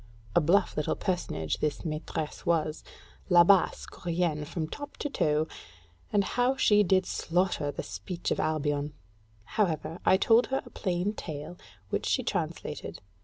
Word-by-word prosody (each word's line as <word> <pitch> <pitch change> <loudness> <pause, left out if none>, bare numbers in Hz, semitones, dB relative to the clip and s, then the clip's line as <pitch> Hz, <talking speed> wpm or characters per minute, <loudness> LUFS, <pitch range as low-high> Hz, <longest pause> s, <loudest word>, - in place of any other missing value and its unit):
A 175 - +6
bluff 180 +5 +3
little 150 - 0
personage 80 - -2
this 150 -2 -1
maîtresse 155 -1 -4
was 160 -2 0 0.5
Labasse 180 +2 +5
courienne 170 -3 -2
from 160 -1 -3
top 290 - -8
to 290 - -3
toe: 150 - +1 0.6
and 205 -1 +3
how 245 +6 +1
she 210 -5 +5
did 185 -1 +3
slaughter 175 -5 0
the - - -5
speech 105 - -5
of - - 0
Albion! 145 -1 0 0.5
However, 165 - -1
I 190 - +5
told 225 +4 +4
her 270 - -1
a - - -13
plain 185 +1 -1
tale, 155 -3 -6 0.4
which - - -1
she - - +1
translated. - - -3
170 Hz, 145 wpm, -29 LUFS, 150-190 Hz, 0.6 s, A